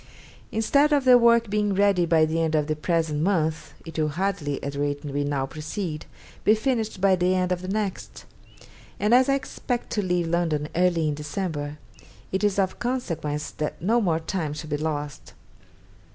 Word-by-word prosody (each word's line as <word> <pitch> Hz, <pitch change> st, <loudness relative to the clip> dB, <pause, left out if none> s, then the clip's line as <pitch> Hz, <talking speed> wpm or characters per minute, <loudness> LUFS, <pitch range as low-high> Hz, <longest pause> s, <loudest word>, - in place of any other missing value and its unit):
Instead 280 Hz, +7 st, +3 dB
of 285 Hz, -2 st, +2 dB
the 255 Hz, -1 st, +8 dB
work 235 Hz, -1 st, +5 dB
being 205 Hz, -1 st, 0 dB
ready 195 Hz, -3 st, +3 dB
by 160 Hz, -1 st, +4 dB
the 160 Hz, +1 st, -1 dB
end 160 Hz, -1 st, +1 dB
of 150 Hz, -1 st, +2 dB
the 155 Hz, 0 st, -1 dB
present 160 Hz, -1 st, 0 dB
month, 160 Hz, -3 st, 0 dB
it 165 Hz, -1 st, -6 dB
will 155 Hz, -, +2 dB
hardly, 160 Hz, -2 st, -1 dB
at 140 Hz, -, -3 dB
the 140 Hz, -, -5 dB
rate 145 Hz, 0 st, -2 dB
we 145 Hz, 0 st, -2 dB
now 145 Hz, -2 st, -1 dB
proceed, 155 Hz, +3 st, -5 dB, 0.4 s
be 215 Hz, -, +5 dB
finished 220 Hz, -3 st, -1 dB
by 190 Hz, 0 st, +4 dB
the 180 Hz, +1 st, +1 dB
end 185 Hz, 0 st, 0 dB
of 180 Hz, -1 st, -1 dB
the 185 Hz, -, -6 dB
next; 200 Hz, -1 st, -4 dB, 0.7 s
and 210 Hz, +3 st, +2 dB
as 255 Hz, +2 st, +5 dB
I 275 Hz, -, +4 dB
expect 250 Hz, -2 st, -4 dB
to 210 Hz, -, 0 dB
leave 180 Hz, -2 st, 0 dB
London 165 Hz, -3 st, 0 dB
early 175 Hz, -2 st, +2 dB
in 150 Hz, -, 0 dB
December, 150 Hz, -1 st, -4 dB, 0.5 s
it 190 Hz, +2 st, -1 dB
is 205 Hz, -2 st, +2 dB
of 190 Hz, -2 st, 0 dB
consequence 160 Hz, -, -3 dB
that 150 Hz, -, -4 dB
no 225 Hz, +7 st, +2 dB
more 165 Hz, -6 st, +1 dB
time 160 Hz, -2 st, -3 dB
should 155 Hz, 0 st, -8 dB
be 150 Hz, -, +1 dB
lost. 145 Hz, -2 st, -4 dB
175 Hz, 190 wpm, -25 LUFS, 150-205 Hz, 0.7 s, the